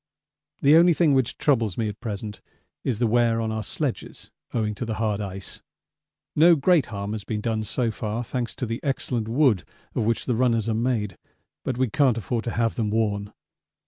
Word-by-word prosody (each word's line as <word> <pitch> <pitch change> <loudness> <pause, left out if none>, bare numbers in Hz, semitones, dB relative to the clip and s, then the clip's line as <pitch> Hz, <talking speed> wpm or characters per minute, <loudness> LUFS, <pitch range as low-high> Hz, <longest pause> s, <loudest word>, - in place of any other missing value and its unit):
The 145 +3 +7
only 170 +1 +6
thing 155 -4 +4
which 130 -3 +1
troubles 115 - +1
me 115 - 0
at 105 0 -6
present 105 -2 -5 0.4
is 125 -5 0
the 120 - +1
wear 115 0 +3
on 110 -1 -1
our 110 0 -2
sledges - - -4 0.2
owing 110 -3 0
to 105 - -5
the 110 -2 -3
hard 110 -2 -1
ice. 95 -1 -6 0.7
No 170 +3 +7
great 160 0 +3
harm 100 -1 -4
has 110 -2 -4
been 105 +1 -3
done 110 0 -1
so 115 +2 -1
far, 110 +2 -3
thanks 120 0 -3
to - - -3
the 115 0 -3
excellent 125 -5 -1
wood 120 - +3 0.3
of - - 0
which 115 +1 0
the 125 - +1
runners 115 -2 +2
are 115 - +1
made, 110 -4 -1 0.4
but 125 - -2
we 130 0 +2
can't 130 0 +2
afford 115 +2 -2
to 115 - -1
have 115 -1 +2
them 110 -3 0
worn. 105 -2 0
115 Hz, 200 wpm, -25 LUFS, 105-125 Hz, 0.7 s, The